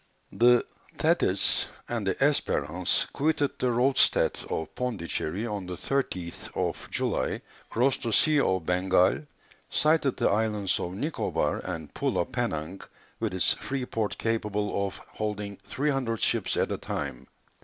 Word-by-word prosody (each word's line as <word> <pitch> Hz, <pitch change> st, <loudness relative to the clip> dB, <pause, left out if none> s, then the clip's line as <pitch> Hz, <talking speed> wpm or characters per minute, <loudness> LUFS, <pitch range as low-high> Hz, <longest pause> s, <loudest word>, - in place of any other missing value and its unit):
The 120 Hz, 0 st, +5 dB, 0.3 s
Thetis -, -, +3 dB, 0.2 s
and 115 Hz, -4 st, -2 dB
the 95 Hz, -, +1 dB
Espérance 90 Hz, -, +1 dB
quitted 145 Hz, -1 st, +1 dB
the 125 Hz, -, +1 dB
roadstead 125 Hz, +3 st, +3 dB
of 80 Hz, -, -3 dB
Pondicherry 100 Hz, -4 st, -2 dB
on 105 Hz, -5 st, -4 dB
the 90 Hz, -1 st, -5 dB
30th 95 Hz, -6 st, -3 dB
July, -, -, -1 dB, 0.3 s
crossed 130 Hz, +3 st, +2 dB
the 115 Hz, -, -2 dB
Sea 150 Hz, +6 st, +4 dB
of 95 Hz, -, +1 dB
Bengal, 95 Hz, -, +2 dB, 0.4 s
sighted 155 Hz, -3 st, +2 dB
the -, -, +2 dB
islands 105 Hz, -2 st, +1 dB
of 90 Hz, +1 st, -4 dB
Nicobar 150 Hz, +10 st, -1 dB
and 80 Hz, -4 st, -5 dB
Pulo -, -, 0 dB
Penang, 80 Hz, +5 st, -3 dB, 0.4 s
with -, -, -2 dB
its 95 Hz, -, +3 dB
free 135 Hz, -2 st, -4 dB
port 110 Hz, -4 st, -2 dB
capable 105 Hz, -3 st, -1 dB
of 95 Hz, -, -8 dB
holding 105 Hz, -2 st, -5 dB
300 135 Hz, -5 st, -1 dB
ships -, -, +1 dB
at -, -, +1 dB
a -, -, -2 dB
time. -, -, -4 dB
105 Hz, 135 wpm, -28 LUFS, 95-130 Hz, 0.4 s, The